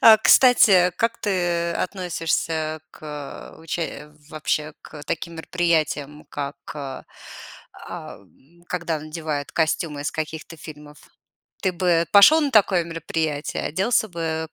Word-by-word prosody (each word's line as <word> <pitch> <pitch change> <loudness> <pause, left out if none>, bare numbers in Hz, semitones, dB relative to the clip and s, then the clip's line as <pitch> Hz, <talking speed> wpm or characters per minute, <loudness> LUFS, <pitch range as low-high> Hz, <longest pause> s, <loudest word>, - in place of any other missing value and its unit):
А, 220 -1 +9
кстати, 200 -10 +6
как 230 +3 0
ты 175 -4 0
относишься 165 -3 -2
к 150 -2 -9
уча 160 -2 -5 0.2
вообще 155 0 -2
к 150 -2 -11
таким 165 +3 -4
мероприятиям, 155 -4 -1
как, 140 0 -5 0.2
а, 135 -3 -7 1.6
когда 170 -3 -2
надевают 155 -2 -5
костюмы 155 -2 0
из 145 - -2
каких-то 160 +1 -5
фильмов? 150 -1 -12 0.6
Ты 190 -3 0
бы 175 -2 +2
пошел 210 +11 +8
на 285 -2 0
такое 195 -6 +4
мероприятие, 160 -2 -3
оделся 210 +7 +1
бы 160 -3 -3
165 Hz, 110 wpm, -23 LUFS, 155-180 Hz, 1.6 s, А